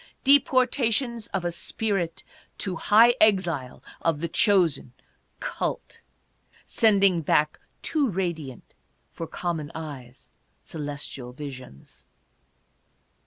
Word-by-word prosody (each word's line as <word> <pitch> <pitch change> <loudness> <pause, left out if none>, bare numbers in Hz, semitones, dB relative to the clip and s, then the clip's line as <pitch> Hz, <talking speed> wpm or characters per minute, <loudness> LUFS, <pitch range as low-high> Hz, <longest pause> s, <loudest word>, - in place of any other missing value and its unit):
Deportations 255 -4 +2
of 175 - -3
a 175 - 0
spirit 175 -1 -2 0.3
to 185 -2 -2
high 225 +7 +5
exile 175 -11 +2 0.2
of 165 -3 0
the 170 - -2
chosen 175 - +2 0.5
"cult," - - -4 0.6
sending 195 -6 +4
back, 150 0 +1 0.2
too 295 -5 +1
radiant 170 - -4 0.4
for 165 - -6
com 175 0 -3
mon 150 -2 -7
eyes, 135 -6 -9 0.3
celestial 145 -5 -7
visions. 130 - -10
170 Hz, 95 wpm, -25 LUFS, 145-215 Hz, 0.6 s, high